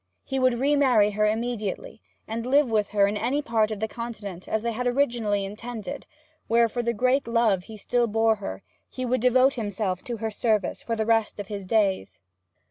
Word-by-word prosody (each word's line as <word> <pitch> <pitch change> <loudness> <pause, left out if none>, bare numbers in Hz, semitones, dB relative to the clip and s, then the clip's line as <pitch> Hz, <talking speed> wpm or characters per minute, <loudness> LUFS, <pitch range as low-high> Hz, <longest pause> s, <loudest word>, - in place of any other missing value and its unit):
He 270 - -2
would 255 -1 +3
remarry 265 -7 +4
her 210 +1 +1
immediately, 220 -2 -3 0.3
and 225 +1 -3
live 265 0 +3
with 210 -2 +1
her 200 -1 +3
in 200 +1 -1
any 250 +8 -1
part 225 -3 +1
of 215 -2 -4
the 220 - -1
Continent, 210 -6 -7
as 220 0 -1
they 235 - 0
had 250 +2 -2
originally 235 -6 +1
intended, 215 0 -7 0.4
where, 230 +1 +4
for 240 +2 -3
the 235 0 0
great 255 +3 +1
love 225 -6 +2
he 220 - -10
still 240 +3 0
bore 225 0 +2
her, 95 - -6 0.3
he 255 - -5
would 250 -1 0
devote 255 +2 +4
himself 205 -5 -3
to 240 -2 -4
her 220 0 -3
service 215 -2 0
for 230 - -2
the 220 -1 -1
rest 225 -2 +1
of 200 - -6
his 200 -3 -6
days. 195 - 0
225 Hz, 200 wpm, -25 LUFS, 210-245 Hz, 0.4 s, remarry